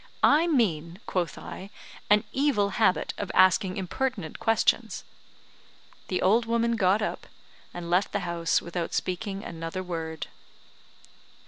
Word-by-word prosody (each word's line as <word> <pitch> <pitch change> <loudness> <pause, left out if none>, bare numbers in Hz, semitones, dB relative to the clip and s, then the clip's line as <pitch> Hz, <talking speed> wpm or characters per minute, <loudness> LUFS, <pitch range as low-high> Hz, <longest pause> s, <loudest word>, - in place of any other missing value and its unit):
"I 310 +4 +5
mean," 175 - +1
quoth 180 -3 -2
I, 195 - -8 0.4
"an 210 +1 +5
evil 260 -8 +2
habit 195 -2 +1
of 200 - -3
asking 185 0 +4
impertinent 195 -1 -3
questions." 225 -1 +1 1.0
The 180 - -1
old 225 +5 +3
woman 235 0 +1
got 200 0 +3
up, - - -4 0.4
and 175 -1 -7
left 180 +3 +2
the 205 - -1
house 170 -2 0
without 170 0 -3
speaking 195 +2 -3
another 165 +2 -5
word. 160 -3 -4
190 Hz, 125 wpm, -27 LUFS, 175-225 Hz, 1.0 s, I